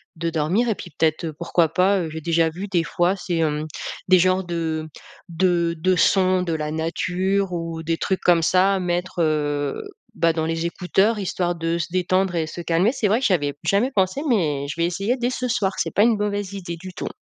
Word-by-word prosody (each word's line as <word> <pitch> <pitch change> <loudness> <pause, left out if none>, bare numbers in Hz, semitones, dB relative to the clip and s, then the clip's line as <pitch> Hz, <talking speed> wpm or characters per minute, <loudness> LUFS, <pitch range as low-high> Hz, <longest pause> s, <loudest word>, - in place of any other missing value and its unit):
de 165 0 -2
dormir, 165 +10 +1
et 220 - +1
puis 175 - -10
peut-être, 160 +1 +1
heu, 160 - -4
pourquoi 170 +1 +1
pas, 190 +5 +2
heu- 165 - -3
j'ai 160 +1 -6
déjà 165 0 +2
vu 180 +5 -6
des 180 -4 +1
fois 175 +4 +1
c'est, 175 -3 -3
hem, 155 -1 0 0.4
des 185 -1 +6
genres 185 +1 +2
de 165 -3 -3 0.4
de 170 -1 +1
de 185 +3 +2
sons 185 +1 +3
de 170 -2 -2
la 155 -1 -2
nature 185 +4 -1
ou 165 -2 -4
des 165 +1 -1
trucs 190 +2 -1
comme 170 -2 +4
ça- 190 +3 +3
mettre, 180 0 -2
heu, 145 -2 0 0.4
bah, 165 -4 +2
dans 160 -1 -1
les 165 +1 -1
écouteurs 195 +5 +1
histoire 180 -3 -1
de 165 0 -1
se 170 - -2
détendre 185 0 +1
et 165 -2 0
se 155 +2 -7
calmer. 170 +6 +2
C'est 245 -5 0
vrai 215 +4 +2
que - - 0
j'y 195 - +3
avais 145 -5 0
jamais 205 +6 +2
pensé, 190 +7 +1
mais 150 - +1
je 155 - -6
vais 170 - +3
essayer 195 +8 -1
dès 245 0 -1
ce 255 0 -2
soir, 205 -5 0
c'est - - 0
pas 205 - +5
une 230 -1 +3
mauvaise 205 -1 -2
idée 175 -4 -6
du 185 +1 -9
tout. - - -5
175 Hz, 225 wpm, -22 LUFS, 165-190 Hz, 0.4 s, des